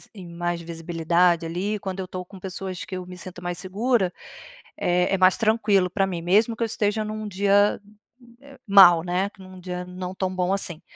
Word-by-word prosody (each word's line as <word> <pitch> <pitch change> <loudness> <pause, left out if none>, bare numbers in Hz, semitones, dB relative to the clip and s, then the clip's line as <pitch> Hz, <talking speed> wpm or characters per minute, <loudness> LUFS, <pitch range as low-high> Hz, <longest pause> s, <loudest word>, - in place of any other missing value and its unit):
em 185 -3 -10
mais 175 0 -3
visibilidade 170 +1 +1
ali, 185 +6 -2
quando 190 -2 -6
eu 185 - -4
tô 180 0 -6
com 190 +1 -13
pessoas 185 -1 -6
que 190 - -7
eu 180 - -7
me 180 0 -10
sinto 180 -1 -10
mais 175 0 -4
segura, 195 +1 0 0.6
é 180 +2 +1
é - - +3
mais 185 0 +4
tranquilo 215 -5 +2
pra 195 -1 +1
mim, 175 -3 -4
mesmo 215 +6 +3
que 235 - -1
eu - - +2
esteja 215 -1 -1
num 215 0 -5
dia 200 +1 +2 0.9
mal, 180 -4 +8
né, 180 +3 -1
num 185 -1 -12
dia 180 0 -5
não 180 0 -7
tão 185 -1 -2
bom 180 0 0
assim. 175 -5 -4
185 Hz, 190 wpm, -24 LUFS, 175-200 Hz, 0.9 s, mal